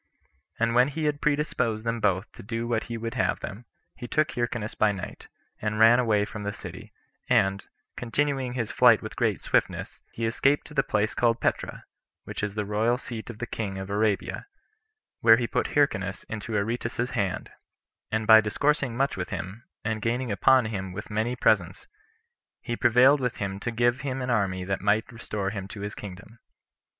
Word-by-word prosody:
And 115 0 +1
when 125 +2 +5
he 155 +3 -4
had 145 -1 0
predisposed 125 -7 0
them 115 0 -1
both 95 -1 0
to - - -12
do 115 +2 -3
what 115 -2 0
he 120 -1 -5
would 115 0 -4
have - - 0
them, 110 +5 -7 0.3
he 120 - -7
took 155 +5 +1
Hyrcanus 120 -3 -2
by 110 -1 +3
night, 95 -3 -7 0.3
and 105 0 -1
ran 115 +2 +7
away 105 -4 +2
from 105 0 -7
the 100 0 -2
city, - - -9 0.4
and, 100 -5 +3 0.3
continuing 130 +1 -1
his 120 -4 -2
flight - - +5
with - - -7
great - - 0
swiftness, - - 0
he 115 - -3
escaped 135 +5 +2
to - - -12
the 135 - +3
place 110 -4 0
called 120 -1 +2
Petra, - - -2 0.4
which - - -6
is 105 -1 -3
the 105 -1 -1
royal 110 +4 +1
seat 120 -3 -7
of 120 - -7
the 115 - -4
king 100 -4 -4
of 95 +1 -6
Arabia, 105 - 0 0.7
where 115 -1 +7
he 120 - 0
put - - -2
Hyrcanus 100 -10 +1
into 110 0 -5
Aretas's 115 +3 -1
hand; 100 -6 -2 0.6
and 110 0 0
by 110 0 +9
discoursing 130 +3 0
much 135 +1 +1
with 90 -1 -4
him, 100 +6 -6 0.2
and 110 0 -2
gaining 120 +2 -1
upon 130 +5 +4
him 95 -4 -4
with 105 +3 -7
many 110 +4 0
presents, - - +1 0.7
he 120 - -4
prevailed 125 +5 +5
with 125 -2 -2
him 95 -1 -3
to 120 - -3
give 120 +3 +1
him 130 -1 -3
an 125 - -1
army 95 -5 0
that 95 +1 -2
might 105 +4 +1
restore 105 -4 -4
him 95 -2 -5
to 100 0 -9
his 105 0 -4
kingdom. 105 +3 -10
115 Hz, 190 wpm, -27 LUFS, 105-125 Hz, 0.7 s, by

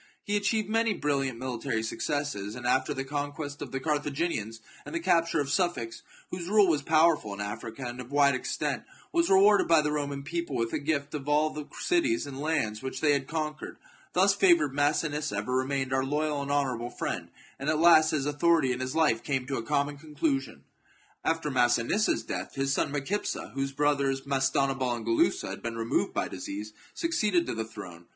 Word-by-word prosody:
He 205 - -1
achieved 205 +1 +1
many 225 0 +1
brilliant 135 -6 -1
mili 125 -2 -4
tary 110 -1 -1
successes, 115 -4 -3
and 120 -1 -8
after 130 +1 +2
the 135 - -2
conquest 145 +1 -4
of - - -6
the 135 - -2
Car 150 +2 +1
thaginians, 140 -7 -3 0.2
and - - -7
the - - +1
capture 165 - +2
of 140 -1 -1
Sufax, 145 -10 -1 0.3
whose 180 -1 -5
rule 205 0 +5
was 155 -4 +2
powerful 155 -8 +3
in - - -11
Africa, 110 +4 -5
and 120 +1 -5
of 125 +2 -11
wide 140 -1 +4
extent, 130 - -2 0.3
was 340 -1 +2
rewarded 200 +2 +6
by 165 -1 +6
the 150 0 -1
Roman 140 -2 -2
people 170 -1 -3
with 115 -1 -1
a - - 0
gift 140 -1 -1
of 145 -1 -4
all 150 +1 +3
the 150 -1 -7
cities 340 -1 +1
and 135 -1 -7
lands 145 -9 -1
which 130 0 -5
they 150 -2 +3
had 140 -1 -1
conquered. 155 -1 -4 0.4
Thus 195 +2 +4
favoured, 170 -8 +4
Massinissa 145 +1 0
ever 125 - -2
remained 130 0 0
our 130 0 +2
loyal 150 +1 -1
and 140 - -5
honourable 130 -4 0
friend, - - -4 0.3
and 140 +2 -2
at 155 - +2
last 160 -1 +6
his 145 -3 0
authority 150 -1 +3
and 125 +1 -2
his 130 +2 -3
life 150 -8 +3
came 135 -3 -1
to 135 +1 -2
a - - -2
common 145 +4 0
conclusion. 140 -4 -2 0.6
After 165 -2 0
Massinissa's 120 - +2
death, 95 -4 -5
his 135 0 0
son - - 0
Micipsa, 145 +9 -2
whose 135 0 -2
brothers, 140 -1 +1
Mastanabal 135 -2 +1
and 115 -2 -7
Gulussa, 115 -11 +1
had - - -7
been 115 -1 -4
removed 115 0 0
by - - -1
disease, 105 +2 -6 0.2
succeeded 215 - +1
to - - -3
the 110 0 -3
throne. 90 -6 -10
145 Hz, 195 wpm, -28 LUFS, 130-160 Hz, 0.6 s, rewarded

